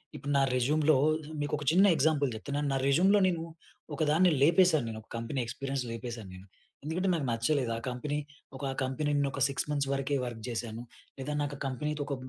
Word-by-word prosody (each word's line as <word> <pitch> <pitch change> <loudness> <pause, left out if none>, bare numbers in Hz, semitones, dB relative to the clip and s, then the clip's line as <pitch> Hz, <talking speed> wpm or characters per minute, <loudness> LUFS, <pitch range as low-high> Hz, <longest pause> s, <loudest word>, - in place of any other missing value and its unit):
ఇప్పుడు 140 - -4
నా - - +4
రెజ్యూమ్‌లో 150 +4 +3 0.2
ఆహ్, 155 - -2 0.2
మీకోక 145 0 -2
చిన్న 190 +4 +6
ఎగ్జాంపుల్ 145 -2 +2
చెప్తున్నాను. 145 +6 -3
నా - - +1
రెజ్యూమ్‌లో 190 +9 +4
నేను 170 -3 -1 0.5
ఒక - - -11
దాన్ని 180 +3 +4
లేపేశాను. 165 -3 +5
నేను 110 -1 -6
ఒక 110 - -26
కంపెనీ 115 +3 -3
ఎక్స్పీరియన్స్ 135 +2 -3
లేపేశాను 115 -3 -6
నేను. 95 +2 -13 0.4
ఎందుకంటే, 175 +6 -1
నాకు 160 -5 -1
నచ్చలేదు 115 +2 0
ఆ - - -4
కంపెనీ. 135 +4 -3 0.4
ఒక 135 0 -3
కంపెనీ 140 +3 -1
న్ 140 - +1
ఒక 135 - -5
6 140 - -3
మంత్స్ 140 -2 0
వరకే 135 +1 -1
వర్క్ 120 -2 -6
చేశాను. 115 0 -4 0.4
లేదా 145 +3 -3
నాకా 140 -1 -4
కంపెనీ‌తో 150 +3 -3
ఒక 140 - -2
140 Hz, 185 wpm, -30 LUFS, 125-155 Hz, 0.5 s, చిన్న